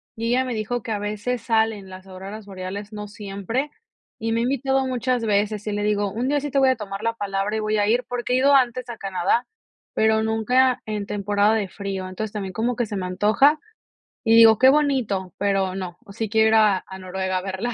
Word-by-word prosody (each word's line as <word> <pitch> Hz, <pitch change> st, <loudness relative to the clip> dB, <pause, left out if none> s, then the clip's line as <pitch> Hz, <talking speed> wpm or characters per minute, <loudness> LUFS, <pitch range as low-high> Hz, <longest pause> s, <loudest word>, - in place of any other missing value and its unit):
y 230 Hz, +1 st, -2 dB
ella 255 Hz, +2 st, +2 dB
me 255 Hz, -, -3 dB
dijo 225 Hz, +2 st, -2 dB
que 225 Hz, -, -6 dB
a 210 Hz, -, -1 dB
veces 210 Hz, +4 st, -3 dB
salen 220 Hz, -4 st, 0 dB
las 185 Hz, +1 st, -11 dB
auroras 195 Hz, +3 st, -9 dB
boreales, 200 Hz, +2 st, -7 dB
no 210 Hz, 0 st, -6 dB
siempre, 205 Hz, +6 st, -4 dB, 0.5 s
y 225 Hz, +1 st, -3 dB
me 230 Hz, -, +1 dB
ha -, -, +1 dB
invitado 270 Hz, +1 st, 0 dB
muchas 250 Hz, -1 st, -1 dB
veces, 210 Hz, 0 st, 0 dB
y 210 Hz, -, -1 dB
le 205 Hz, 0 st, -2 dB
digo: 205 Hz, -1 st, +1 dB
"Un 235 Hz, +6 st, -2 dB
día 290 Hz, 0 st, +2 dB
sí 290 Hz, +1 st, -4 dB
te 275 Hz, -, 0 dB
voy 270 Hz, -1 st, +5 dB
a 260 Hz, -, +3 dB
tomar 200 Hz, -1 st, -6 dB
la 230 Hz, 0 st, +1 dB
palabra 200 Hz, -1 st, -2 dB
y -, -, 0 dB
voy 215 Hz, 0 st, 0 dB
a 205 Hz, 0 st, +2 dB
ir", 240 Hz, +3 st, +2 dB
porque 245 Hz, 0 st, -2 dB
he -, -, +4 dB
ido 280 Hz, +2 st, +5 dB
antes 255 Hz, -1 st, +2 dB
a 235 Hz, -, -6 dB
Canadá, 195 Hz, +5 st, 0 dB, 0.5 s
pero 220 Hz, 0 st, +2 dB
nunca 245 Hz, +4 st, +2 dB
en 210 Hz, -2 st, -3 dB
temporada 205 Hz, +1 st, +1 dB
de 215 Hz, -3 st, 0 dB
frío. 195 Hz, -1 st, -5 dB
Entonces, 200 Hz, +3 st, -5 dB
también 195 Hz, -3 st, -5 dB
como 235 Hz, +5 st, -1 dB
que 240 Hz, -, 0 dB
se 210 Hz, -, -6 dB
me 190 Hz, -2 st, -3 dB
antoja, 215 Hz, +11 st, +3 dB, 0.6 s
y 225 Hz, -1 st, +4 dB
digo: 225 Hz, -1 st, +8 dB
"Qué 260 Hz, +4 st, +6 dB
bonito, 255 Hz, -, +1 dB
pero 195 Hz, -2 st, 0 dB
no". 180 Hz, -2 st, -6 dB
Sí 220 Hz, +2 st, -4 dB
quiero 220 Hz, +1 st, +4 dB
ir 220 Hz, -, +3 dB
a 210 Hz, -3 st, +5 dB
a 190 Hz, 0 st, -9 dB
Noruega 185 Hz, 0 st, -3 dB
a -, -, -2 dB
verlas. 195 Hz, +6 st, -3 dB
215 Hz, 230 wpm, -23 LUFS, 200-240 Hz, 0.6 s, digo